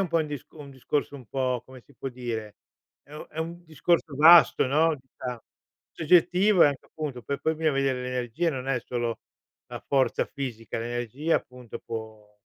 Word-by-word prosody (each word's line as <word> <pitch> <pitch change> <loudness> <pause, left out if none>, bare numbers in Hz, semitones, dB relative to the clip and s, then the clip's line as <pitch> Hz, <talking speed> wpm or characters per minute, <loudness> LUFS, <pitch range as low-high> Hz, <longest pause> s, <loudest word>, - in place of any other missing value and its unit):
un 190 - 0
po' 165 0 +2
un 155 - 0
dis 145 -3 -6
un 145 -3 -11
discorso 140 +2 -2
un 130 - -12
po', 125 -1 -1
come 130 -1 -13
si 140 - -23
può 135 - -5
dire 115 -4 -5 0.5
è 145 - -15
un 150 - -8
è 155 - -10
un 170 +2 -5
discorso 160 0 0
vasto, 160 -3 +7
no, 155 +4 +3
si 130 - -36
sa. 125 -3 -5 0.5
Soggettivo, 180 +4 +4
e - - +7
anche 140 -2 -2
appunto 140 -6 -6
per 140 +5 -3
poi 160 - +1
bisogna 160 0 +1
veder 135 -1 +1
le 125 0 -4
energie, 125 +7 -1
non 130 -3 -5
è 125 -3 +1
solo 120 -2 -3 0.5
la - - -6
forza 135 -2 +1
fisica, 120 -6 -6
l'energia 120 +7 -1
appunto 125 -2 -8
può 110 -2 -8
135 Hz, 195 wpm, -27 LUFS, 125-155 Hz, 0.5 s, vasto